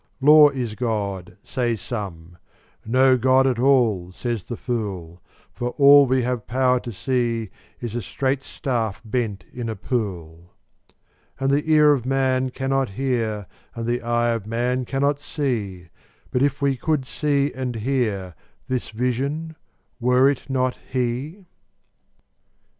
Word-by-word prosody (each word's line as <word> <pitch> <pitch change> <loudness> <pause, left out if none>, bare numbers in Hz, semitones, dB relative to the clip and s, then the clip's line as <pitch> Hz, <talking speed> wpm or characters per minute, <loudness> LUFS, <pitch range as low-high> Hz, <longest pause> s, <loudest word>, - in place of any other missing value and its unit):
Law 150 +1 +8
is 125 -6 -4
God, 105 -6 -3
say 120 -2 -1
some: 90 -6 -7 0.4
no 130 +2 +4
God 130 +2 +4
at 130 -3 +1
all, 120 -9 +3
says 115 +1 -3
the 120 - -6
fool; 95 -8 -4 0.3
For 120 0 -4
all 140 -1 +8
we 130 0 +2
have 125 -2 -2
power 125 0 +2
to 120 - -7
see 115 -1 -1 0.3
is 120 -3 -5
a 120 - -2
straight 135 +6 -1
staff 115 -7 -3
bent 110 -3 -2
in 120 -2 -4
a 110 - -3
pool; 90 -7 -4 0.8
And 135 0 +1
the 150 +3 +1
ear 150 -1 +6
of 130 -3 -2
man 130 -1 +1
cannot 135 0 -1
hear, 110 -3 -2 0.3
and 115 -1 -4
the 120 +1 -1
eye 120 0 +1
of 115 -3 -2
man 125 +3 -1
cannot 140 +2 0
see; 110 - -3 0.4
But 125 - 0
if 140 0 +1
we 140 -1 +2
could 150 -1 0
see 145 +1 0
and 130 -2 -4
hear, 110 -6 -1 0.3
this 130 -2 -2
Vision—were 130 +1 -1
it 140 - -7
not 130 -1 0
He? 130 +9 -3
125 Hz, 140 wpm, -23 LUFS, 110-135 Hz, 0.8 s, Law